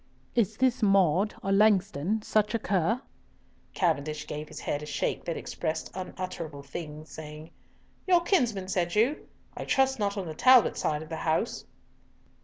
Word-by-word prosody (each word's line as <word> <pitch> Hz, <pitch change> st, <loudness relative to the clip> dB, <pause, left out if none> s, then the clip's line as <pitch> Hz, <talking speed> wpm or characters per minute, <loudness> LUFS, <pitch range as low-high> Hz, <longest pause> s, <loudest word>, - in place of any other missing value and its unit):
"Is 220 Hz, -2 st, +1 dB
this 255 Hz, -2 st, +2 dB
Maude, 195 Hz, -1 st, +3 dB
or 195 Hz, -, -1 dB
Langston, 200 Hz, -1 st, +2 dB
such 215 Hz, +1 st, +1 dB
a -, -, +4 dB
cur?" 205 Hz, +4 st, 0 dB, 0.7 s
Cavendish 155 Hz, -3 st, 0 dB
gave 150 Hz, +1 st, -6 dB
his 155 Hz, -, -9 dB
head 145 Hz, -, -2 dB
a 150 Hz, -, -7 dB
shake -, -, -2 dB
that 170 Hz, -, -2 dB
expressed 160 Hz, -2 st, -4 dB
unutterable 180 Hz, -5 st, -6 dB
things, 155 Hz, +1 st, -8 dB
saying: 155 Hz, 0 st, -9 dB, 0.6 s
"Your 355 Hz, -2 st, +5 dB
kinsman, 240 Hz, -, +1 dB
said 180 Hz, -2 st, -1 dB
you? 245 Hz, +9 st, +1 dB, 0.3 s
I -, -, -5 dB
trust 265 Hz, -1 st, +2 dB
not 200 Hz, 0 st, -1 dB
on 195 Hz, -, -2 dB
the 160 Hz, -, -5 dB
Talbot 255 Hz, +7 st, +6 dB
side 150 Hz, 0 st, -1 dB
of 155 Hz, -, -13 dB
the 160 Hz, -, -4 dB
house?" 160 Hz, +8 st, -1 dB
185 Hz, 160 wpm, -28 LUFS, 155-220 Hz, 0.7 s, Talbot